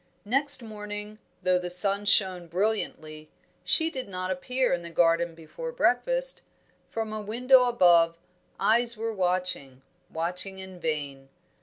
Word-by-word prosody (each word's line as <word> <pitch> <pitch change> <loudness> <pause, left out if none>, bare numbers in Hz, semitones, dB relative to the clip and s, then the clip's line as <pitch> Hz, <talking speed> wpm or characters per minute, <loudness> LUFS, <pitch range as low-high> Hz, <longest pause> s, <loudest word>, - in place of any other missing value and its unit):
Next 275 +3 +4
morning, 210 -1 -8 0.2
though 185 0 +2
the 180 0 -5
sun 195 +3 +4
shone 185 -4 +2
brilliantly, 165 -5 -3 0.3
she 325 0 +3
did 260 -6 -6
not 185 0 -4
appear 250 +8 -1
in 175 - -2
the 170 - -8
garden 165 0 +1
before 165 - -8
breakfast. - - +1 0.5
From 220 -1 -5
a 215 - -5
window 250 +5 +3
above, 175 -8 +3 0.4
eyes 235 +1 +2
were 225 +1 -4
watching, 180 -8 -2 0.3
watching 180 +4 -4
in 190 -1 -9
vain. 145 -4 -5
190 Hz, 135 wpm, -26 LUFS, 170-225 Hz, 0.5 s, Next